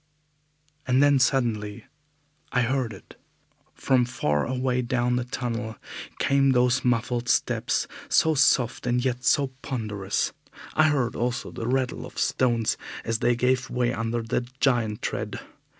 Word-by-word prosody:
And 130 +2 +4
then 145 -1 +5
suddenly 115 -6 0 0.7
I 125 - +2
heard 125 -1 0
it! 95 - -14 0.5
From 130 -2 +2
far 75 -12 -1
away 125 0 0
down 125 0 0
the 125 -1 -1
tunnel 115 -2 -4 0.4
came 135 -1 +3
those 125 0 +3
muffled 120 0 0
steps, - - +1 0.2
so 160 - +4
soft 125 -4 +2
and 125 +1 +1
yet 125 -1 -1
so 140 +2 +3
ponderous. 105 -6 -2 0.4
I 155 - +4
heard 135 -6 0
also 120 +1 -2
the 115 - -5
rattle 130 0 -1
of - - -16
stones 120 -3 +1 0.3
as 115 -1 -1
they 120 0 +2
gave 130 +2 +1
way 125 0 0
under 115 0 -2
that 120 +3 -3
giant 115 -6 +1
tread. - - -3
125 Hz, 140 wpm, -25 LUFS, 115-130 Hz, 0.7 s, then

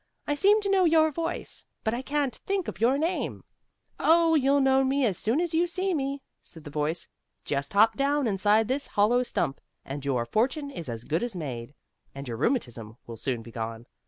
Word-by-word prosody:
"I 290 - 0
seem 405 +8 +4
to 400 - -2
know 385 -1 +4
your 315 -2 +4
voice, 330 +3 -5 0.2
but 220 - 0
I 240 - -2
can't 280 -3 -1
think 390 -2 -2
of 175 - -6
your 250 +4 +4
name." 325 +5 -2 0.6
"Oh, 330 0 +4
you'll 280 -2 +4
know 270 0 +4
me 270 0 +2
as 205 -5 +1
soon 225 - 0
as 345 -1 -1
you 340 +2 +3
see 370 +2 -1
me," 275 -2 -2 0.2
said 160 - -13
the 145 - -9
voice. 150 +3 -2 0.4
"Just 140 +2 -2
hop 220 +2 +5
down 280 0 +1
inside 210 +1 +2
this 270 +3 -1
hollow 220 +5 +3
stump, 140 - -2 0.2
and 140 +1 -6
your 130 -4 0
fortune 265 - 0
is 170 - -7
as 115 -1 -5
good 160 +7 -1
as 240 -4 -3
made, 135 -5 -6 0.4
and 140 0 -7
your 115 -2 -4
rheumatism 120 - -2
will 115 - -8
soon 120 0 -3
be 115 - -11
gone. 115 0 -5
240 Hz, 205 wpm, -27 LUFS, -, 0.6 s, hop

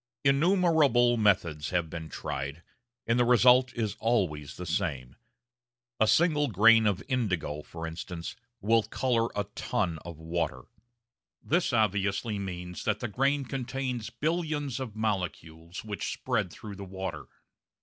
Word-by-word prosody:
Innumerable 145 -5 +4
methods 85 -9 +1
have 85 -2 0
been 80 0 -7
tried, 70 +4 -5 0.4
and 115 +2 +2
the - - +5
result 125 +1 +5
is 110 -4 -2
always 80 -11 0
the 90 - -6
same. 80 -8 -2 0.8
A 110 - +4
single 150 +1 +3
grain 115 +1 +6
of 100 -2 0
indigo, 90 - -1
for 80 +2 -8
instance, 85 +1 -6 0.3
will 115 +3 +4
colour 115 0 0
a 105 - 0
ton 85 -6 -1
of 85 +1 -9
water. 80 -5 -3 0.8
This 175 0 +1
obviously 105 -1 +1
means 90 -2 -6
that 105 -1 0
the 120 - -2
grain 135 +5 +1
contains 125 -3 -3
billions 150 0 -2
of 120 -5 -5
molecules 90 -5 -3
which 105 -2 -3
spread - - -1
through 100 +3 -9
the 100 - -7
water. 95 -4 -6
105 Hz, 135 wpm, -29 LUFS, 85-125 Hz, 0.8 s, grain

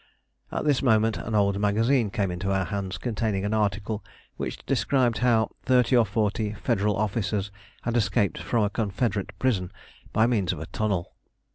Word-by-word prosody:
At - - -2
this 145 -3 +3
moment 110 -4 +3
an 110 - -3
old 100 -1 +2
magazine 110 +3 +2
came 100 -2 -1
into 90 +3 -2
our 95 -1 +1
hands 100 -2 -3
containing 110 -4 -1
an 105 - -1
article 105 0 -1 0.3
which - - -5
described 125 -4 +1
how 115 -3 +3
thirty 125 -1 +3
or 115 -3 +4
forty 105 -1 0
Federal 105 -3 0
officers 105 -1 -1 0.3
had 120 0 -1
escaped 110 -3 +1
from 115 -3 0
a 105 - 0
Confederate 105 -1 -1
prison 100 -9 0 0.4
by 110 - +3
means 110 -6 +1
of 80 - -7
a 80 - -5
tunnel. 100 -2 -2
105 Hz, 165 wpm, -26 LUFS, 100-115 Hz, 0.4 s, or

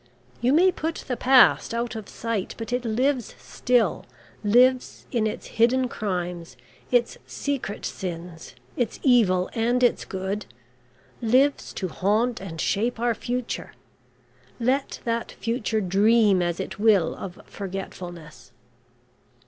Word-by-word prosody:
You 245 +2 +3
may 360 +6 +5
put 325 -1 -4
the 250 - -1
past 255 -2 +5
out 235 0 -2
of 220 -2 -7
sight, 225 -4 -3
but 230 +1 -5
it 250 0 -1
lives 250 +2 0
still 245 -2 0 0.4
lives 250 +4 +3
in 225 -3 +1
its 215 - -5
hidden 250 +3 +2
crimes, 180 -6 -4 0.3
its 240 -1 +1
secret 275 -8 -4
sins, 170 -2 -6 0.2
its 240 -4 -2
evil 205 -9 +4
and 240 +2 +1
its 245 - +3
good 190 +2 -4 0.7
lives 260 +5 +2
to 185 - -3
haunt 215 +7 0
and 165 -4 -7
shape 225 +8 0
our 240 0 +2
future, 245 +2 -4 0.9
let 260 +4 0
that 230 0 -2
future 230 -2 -1
dream 205 +1 +4
as 175 -1 -1
it - - -5
will 205 -5 +4
of 185 -2 -8
forgetfulness." 180 -4 -8
225 Hz, 125 wpm, -25 LUFS, 195-245 Hz, 0.9 s, may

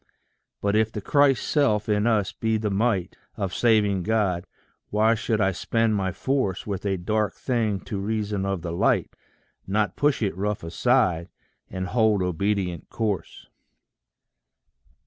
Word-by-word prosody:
But 100 0 +1
if 110 0 +2
the 105 - -4
Christ 140 +5 +3
self 110 -9 +2
in 105 +1 +2
us 105 -5 +2
be 110 -1 -1
the 105 -1 -2
might 100 -2 0 0.2
Of 95 -3 -2
saving 105 -5 +3
God, 95 -3 0 0.4
why 110 +2 +3
should 115 -1 -1
I 95 -1 +3
spend 110 +5 0
my 95 -2 0
force 130 -3 -1
With 100 -1 -3
a 95 -1 0
dark 105 +4 -1
thing 110 -6 -1
to 100 - -5
reason 105 -1 -2
of 95 -3 -2
the 85 - -3
light 85 - +1 0.5
Not 105 +2 0
push 145 -5 +1
it 100 - -1
rough 105 +1 -2
aside, 90 -1 +1 0.4
and 95 0 -4
hold 110 -1 +2
obedient 90 -1 -1
course? 105 -6 -3
105 Hz, 145 wpm, -25 LUFS, 95-110 Hz, 0.5 s, Christ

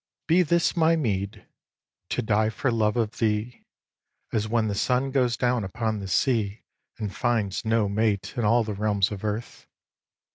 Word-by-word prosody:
vii. 165 - +4
Be - - +7
this 170 +1 +2
my 165 -1 +4
meed, 100 -9 -2 0.6
to 125 - -1
die 110 0 +2
for 120 +4 -1
love 110 0 +1
of 115 -2 -1
thee, 110 +2 -1 0.7
As 110 -1 0
when 110 0 +1
the 105 - -1
sun 125 +6 0
goes 125 -3 +1
down 125 -2 +1
upon 110 +2 -2
the 100 - -6
sea 110 -1 0 0.3
And 105 -3 -5
finds 115 -6 0
no 110 -1 +2
mate 105 0 0
in 120 - -1
all 115 +3 +4
the 110 -1 -4
realms 100 -1 +1
of 105 -1 -6
earth. 110 +2 -4
110 Hz, 175 wpm, -26 LUFS, 105-120 Hz, 0.7 s, Be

